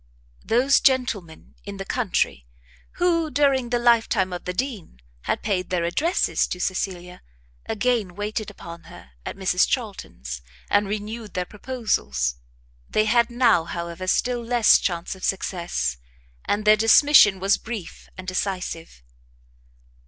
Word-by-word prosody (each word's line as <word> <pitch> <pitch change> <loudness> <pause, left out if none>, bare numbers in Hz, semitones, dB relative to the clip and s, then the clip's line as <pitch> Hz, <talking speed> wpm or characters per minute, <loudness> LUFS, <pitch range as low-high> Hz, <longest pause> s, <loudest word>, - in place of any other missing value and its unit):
Those 255 +5 +3
gentlemen 230 - 0
in 200 -1 -8
the 195 - -6
country 180 - -1 0.5
who, 335 -3 +1
during 270 -3 +2
the 245 - +1
life 235 -1 +3
time 190 -4 0
of 175 - -6
the 180 - -2
Dean, 215 - -4 0.3
had - - -1
paid 195 -4 -1
their 180 -2 0
addresses 300 - +1
to 180 - -5
Cecilia, 180 -1 -3 0.5
again 225 -4 0
waited 210 +1 -3
upon 170 0 -11
her 65 - -14 0.2
at - - -5
Mrs 185 -2 +2
Charlton's, 65 - -4 0.3
and 205 0 +3
renewed 215 +1 -5
their 180 0 -1
proposals. 195 - -2 0.5
They 215 - +2
had 235 +2 +3
now, 240 -8 +3
however, 170 +2 -6
still 245 +4 +1
less 235 -1 +5
chance 170 -2 -2
of 190 - -14
success, 170 - -2 0.5
and 210 +1 -1
their 215 0 +7
dismission 225 -2 +6
was 195 +2 +2
brief 220 -6 -8
and 185 0 -9
decisive. 180 - -4
205 Hz, 135 wpm, -23 LUFS, 180-240 Hz, 0.5 s, their